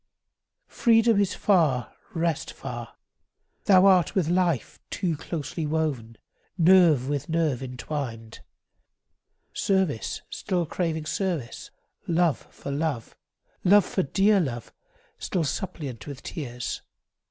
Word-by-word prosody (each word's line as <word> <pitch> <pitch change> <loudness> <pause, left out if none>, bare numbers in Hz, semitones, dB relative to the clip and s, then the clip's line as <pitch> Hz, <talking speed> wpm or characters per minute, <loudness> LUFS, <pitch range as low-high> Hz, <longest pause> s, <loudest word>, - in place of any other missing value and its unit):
Freedom 225 -2 +3
is 200 -1 +1
far, 155 - +2 0.2
rest 165 -1 -1
far. - - -7 0.7
Thou 190 -2 +6
art 185 -4 +4
with 175 -5 +1
life 175 -6 0
Too 175 -5 -1
closely 155 0 -4
woven, 145 -8 -2 0.4
nerve 170 -7 +5
with 145 +1 -2
nerve 160 -6 +1
intwined; 125 -3 -5 1.1
Service 190 - 0
still 180 -2 -1
craving 160 -1 -2
service, 165 - -3 0.4
love 170 -4 +1
for 140 - -7
love, 140 -5 -2 0.5
Love 200 +1 +6
for 190 - -1
dear 195 +6 +3
love, 120 -9 -3 0.5
still 180 -4 -1
suppliant 140 - -4
with 140 -2 -8
tears. 125 -6 -5
160 Hz, 105 wpm, -26 LUFS, 135-185 Hz, 1.1 s, Thou